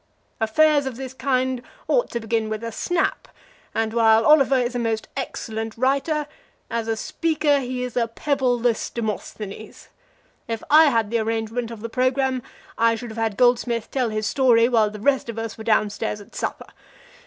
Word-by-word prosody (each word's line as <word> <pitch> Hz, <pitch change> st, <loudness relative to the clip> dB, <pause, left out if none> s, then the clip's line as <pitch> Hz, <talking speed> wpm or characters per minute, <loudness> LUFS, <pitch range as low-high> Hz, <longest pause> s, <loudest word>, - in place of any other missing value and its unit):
Affairs 285 Hz, +6 st, +3 dB
of 260 Hz, -, -4 dB
this 260 Hz, +1 st, -7 dB
kind 260 Hz, -1 st, 0 dB, 0.3 s
ought -, -, +2 dB
to 235 Hz, -, -3 dB
begin 225 Hz, -1 st, -1 dB
with 215 Hz, +1 st, -4 dB
a 230 Hz, -, -4 dB
snap, 350 Hz, +10 st, -1 dB, 0.5 s
and 225 Hz, 0 st, 0 dB
while 225 Hz, -1 st, +4 dB
Oliver 275 Hz, -3 st, +5 dB
is 245 Hz, -1 st, 0 dB
a 245 Hz, -, -2 dB
most 225 Hz, -2 st, -1 dB
excellent 225 Hz, -4 st, -4 dB
writer, 280 Hz, +4 st, +1 dB, 0.5 s
as 230 Hz, -1 st, -2 dB
a 225 Hz, -1 st, -1 dB
speaker 310 Hz, +2 st, +1 dB
he 250 Hz, -1 st, -3 dB
is 250 Hz, -2 st, -5 dB
a 235 Hz, -2 st, +1 dB
pebbleless 245 Hz, -2 st, 0 dB
Demosthenes. 215 Hz, -2 st, -6 dB, 0.6 s
If 225 Hz, -1 st, -4 dB
I 315 Hz, +2 st, +8 dB
had -, -, +5 dB
had 225 Hz, -3 st, 0 dB
the 235 Hz, -, +1 dB
arrangement 225 Hz, +1 st, -2 dB
of 230 Hz, -2 st, -9 dB
the 230 Hz, -, -4 dB
programme 255 Hz, +1 st, +1 dB, 0.4 s
I 230 Hz, 0 st, +4 dB
should 235 Hz, 0 st, -7 dB
have 220 Hz, -, -10 dB
had 225 Hz, -3 st, -1 dB
Goldsmith 245 Hz, -2 st, +2 dB
tell 255 Hz, -4 st, 0 dB
his 215 Hz, 0 st, -2 dB
story 235 Hz, -1 st, +4 dB
while 225 Hz, -4 st, +3 dB
the 210 Hz, 0 st, -9 dB
rest 270 Hz, +2 st, +1 dB
of 230 Hz, -, -5 dB
us 225 Hz, -1 st, -4 dB
were 220 Hz, -, -9 dB
down 215 Hz, -2 st, +2 dB
stairs 210 Hz, 0 st, -3 dB
at 205 Hz, -, -15 dB
supper. -, -, -5 dB
235 Hz, 185 wpm, -23 LUFS, 225-260 Hz, 0.6 s, I